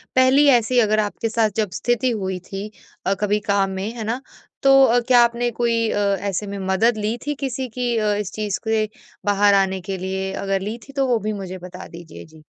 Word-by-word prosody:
पहली 260 +3 +5
ऐसी 240 +2 +1
अगर 215 -2 +3
आपके 215 +2 -2
साथ 220 0 +2
जब 215 -3 +1
स्थिति 240 +1 +1
हुई 190 -4 -3
थी 195 +2 -5 0.4
अ, 195 - +2
कभी 210 0 +1
काम 200 -1 +2
में, 190 +2 -4
है 230 - -5
ना? 230 +4 -2 0.4
तो 270 0 +7
अ, 245 -1 +3
क्या 245 -1 +6
आपने 235 +1 0
कोई 230 -1 0
अ, - - -1 0.2
ऐसे 200 +1 -3
में 200 0 -5
अ, - - -5
मदद 225 +4 +2
ली 215 +2 -2
थी 295 - -1
किसी 265 -1 -3
की 245 -1 0
अ, 210 -1 +1
इस 205 -2 -3
चीज़ 210 -2 -2
के 220 -1 +2 0.4
बाहर 205 0 +4
आने 190 -1 +2
के 190 +1 -4
लिए? 190 +1 -3
अगर 195 -1 -1
ली 210 +4 -4
थी 275 - -13
तो 270 -1 +1
वो 240 -3 +2
भी 215 0 -3
मुझे 190 -2 -6
बता 185 +1 -10
दीजिए? 170 -1 -11
जी। 155 -1 -18
215 Hz, 225 wpm, -21 LUFS, 195-235 Hz, 0.4 s, तो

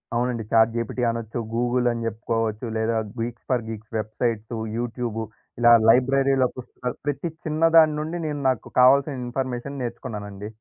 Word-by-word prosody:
అవునండి. 120 -1 0
Chat 115 0 +5
GPT 115 +1 -2
అనొచ్చు, 115 0 -4
Google 120 +1 +1
అని 115 -1 -3
చెప్పుకోవచ్చు, 115 0 -2
లేదా 110 +1 0 0.2
Geeks 120 0 -4
for 120 -3 +1
Geeks 110 0 -8
websites, 110 +1 -2 0.2
YouTube 115 -1 -3 0.4
ఇలా 120 0 +6 0.2
లైబ్రరీలో 135 +2 +4
ప్ - - -5 0.5
ప్రతి 145 +3 -2
చిన్న 155 +1 -2
దాని 155 -1 +7
నుండి 160 +3 -3
నేను 150 -1 -3
నాకు 130 - -2
కావాల్సిన 135 +3 +5
ఇన్‌ఫర్‌మెషన్ 130 +2 -4
నేర్చుకున్నానండి. 105 -4 -6
120 Hz, 140 wpm, -24 LUFS, 115-130 Hz, 0.5 s, దాని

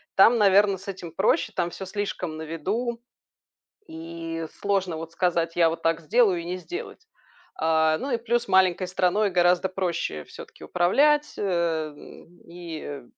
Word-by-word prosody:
там, 225 +5 +6
наверно, 200 -1 +4
с 195 +3 -15
этим 180 -3 -7
проще, 220 - +1
там 175 - 0
всё 190 - -7
слишком 185 -4 -4
на 160 - -7
виду, 210 +10 -3 0.9
и 165 0 -6
сложно 195 -4 0
вот 165 0 -7
сказать: 170 -2 0
я 165 -1 +5
вот 165 - -5
так 165 0 +2
сделаю- 195 +1 +3
и - - -9
не 180 +1 -3
сделать. 370 - -8 0.5
А, 160 0 +2
ну 275 - -4
и 240 - +2
плюс 235 +1 -1
маленькой 185 -1 +3
страной 190 +3 +1
гораздо 180 +1 +3
проще 175 - -3
всё-таки - - -12
управлять, 290 +12 +2
эм, 170 -2 -3
и 165 -5 -7
180 Hz, 150 wpm, -25 LUFS, 165-200 Hz, 0.9 s, там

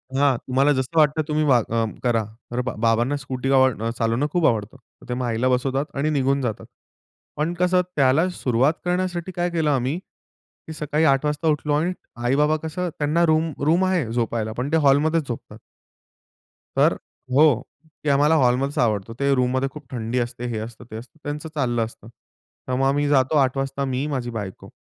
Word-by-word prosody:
हां, 140 -2 +3
तुम्हाला 135 +4 +1
जसं 130 +4 -3
वाटतं 155 0 +4
तुम्ही 155 0 +1
वा 135 -4 +5
अ, 115 0 0 0.2
करा. 115 -3 +2 0.3
तर 120 +1 -1
बा 125 - -3
बाबांना 120 +5 +2
स्कूटी 130 0 -3
आ 135 - +5 0.3
अ, - - 0
चालवणं 115 +5 +1
खूप 175 -1 +1
आवडतं. 110 +2 -1
तर 125 - -23
ते - - -1
मग 125 0 -2
आईला 120 +2 0
बसवतात 135 +2 0
आणि 140 +2 0
निघून 140 -2 +1
जातात, 115 -5 -3 0.7
पण 155 +4 0
कसं 180 +1 +2
त्याला 140 +5 +3
सुरुवात 130 -4 +1
करण्यासाठी 180 0 -1
काय 175 0 0
केलं 160 -3 0
आम्ही, 135 +3 0 0.7
की 160 - -6
सकाळी 150 0 -1
8:00 135 0 +3
वाजता 150 +2 -1
उठलो 150 -1 +1
आणि 165 +5 +1 0.3
आई-बाबा 150 +5 +3
कसं 175 +3 -3
त्यांना 155 +3 +2
रूम 160 0 +2
रूम 170 +5 +3
आहे 185 -6 +1
झोपायला, 115 -2 -1
पण 125 +5 -3
ते 160 - +4
हॉलमध्येच 150 +1 +3
झोपतात. 120 - -7 1.2
तर - - +4 0.4
हो. 140 -3 +5 0.4
की 150 - 0
आम्हाला 145 +3 +4
हॉलमध्येच 135 0 +2
आवडतो. 110 -1 0
ते 140 0 +2
रूममध्ये 130 +1 +1
खूप 150 0 -11
थंडी 120 0 -2
असते, 120 0 -4
हे 115 - -3
असतं, 110 +1 -8
ते - - -7
असतं, 120 +7 -10
त्यांचं 150 +2 -5
चाललं 120 -5 0
असतं. 110 -1 -13 0.6
तर 130 - -2
मग 135 +1 +1
आम्ही 145 +1 +1
जातो 135 +1 +3
8:00 135 -1 +2
वाजता 135 +1 -2
मी, 130 +1 -2
माझी 130 -5 -3
बायको. 105 -5 -7
135 Hz, 185 wpm, -23 LUFS, 125-155 Hz, 1.2 s, वा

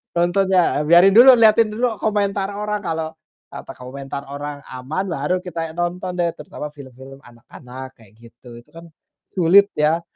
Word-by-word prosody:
nontonnya. 180 -1 +2
Biarin 175 +4 +6
dulu, 255 +2 +9
liatin 220 0 +5
dulu 235 0 -1
komentar 200 -2 -1
orang 210 0 -3
kalau, 160 -2 -3 0.4
apa - - -9
komentar 135 +2 -8
orang 145 +1 -7
aman 140 +9 -4
baru 170 +4 -2
kita 165 -2 -5
nonton 180 +1 -4
deh, 170 -1 +1
terutama 150 - -8
film-film 135 -1 -13
anak-anak 125 +2 -12
kayak 110 -3 -19
gitu, 120 +1 -17
itu - - -30
kan 165 0 -11 0.5
sulit 190 +3 +5
ya, 155 +3 +1
170 Hz, 150 wpm, -20 LUFS, 140-195 Hz, 0.5 s, dulu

